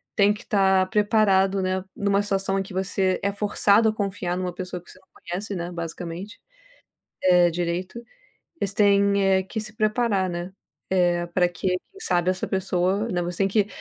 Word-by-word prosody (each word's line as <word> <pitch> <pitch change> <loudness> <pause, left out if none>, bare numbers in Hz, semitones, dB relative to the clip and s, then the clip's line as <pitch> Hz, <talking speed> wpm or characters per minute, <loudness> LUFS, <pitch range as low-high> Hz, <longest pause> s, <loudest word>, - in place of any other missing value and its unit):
tem 205 -1 +4
que 210 - -10
estar 190 -4 +2
preparado, 200 -2 +3
né, 185 0 -1
em 200 - -3
uma 200 0 +3
situação 195 -1 0
em - - -1
que 190 0 -11
você 190 0 0
é 200 - +1
forçado 205 +1 +3
a 215 - -1
confiar 190 -4 -3
em - - -2
uma 180 -1 -3
pessoa 180 0 -6
que - - -15
você 185 - -16
não 190 - -29
conhece, 190 +4 -6
né, 175 0 -4
basicamente, 170 +3 -6 0.8
eh, 180 -1 +5
direito, 175 +6 -3 0.6
eles 200 -1 -1
têm, 200 -1 +3
eh, 190 -1 +3
que 220 +4 -5
se 215 0 -7
preparar, 215 -3 +1
né, 175 +2 -5 0.4
eh, 175 -2 +2
para 175 0 +2
que, 175 +2 -3
quem 180 - -4
sabe, 180 - +1
essa 185 - -2
pessoa, 190 +3 0
né, 175 -3 -1
você 175 0 -4
tem 195 -1 +2
que 205 0 +2
190 Hz, 190 wpm, -24 LUFS, 180-200 Hz, 0.8 s, eh